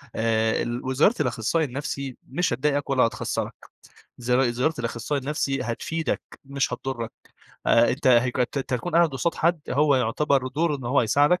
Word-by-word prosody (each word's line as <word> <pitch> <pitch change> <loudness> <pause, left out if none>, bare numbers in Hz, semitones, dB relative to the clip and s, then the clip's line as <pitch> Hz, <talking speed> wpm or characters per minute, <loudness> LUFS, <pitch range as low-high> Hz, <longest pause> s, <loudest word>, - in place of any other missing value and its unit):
آآ، 110 0 +1
ال 120 +2 -3
وزيارة 135 - +3
الأخصائي 125 +4 0
النفسي 135 -1 -5
مش 175 +7 0
هتضايقك 145 0 0
ولا 130 -2 +3
هتخسّرك، 115 - -2 0.7
زيار 125 +1 +2
زيارة 130 +7 0
الأخصائي 120 +4 -2
النفسي 135 -2 -1
هتفيدك 160 +7 -2 0.2
مش 140 -1 -1
هتضرك، 120 -2 -4 0.5
آآ 115 +1 +5
أنتَ 130 +3 -3
هَيك 125 0 +4
أنتَ 125 +3 0
هتكون 125 0 -3
قاعد 170 -1 +5
قُصاد 145 +5 -1
حد 170 -1 +1
هو 145 +1 +3
يُعتبر 130 +3 +1
دوره 150 +2 0
إنه 125 -3 -6
هو 140 - +3
هيساعدك 145 +10 +3
135 Hz, 160 wpm, -25 LUFS, 120-150 Hz, 0.7 s, آآ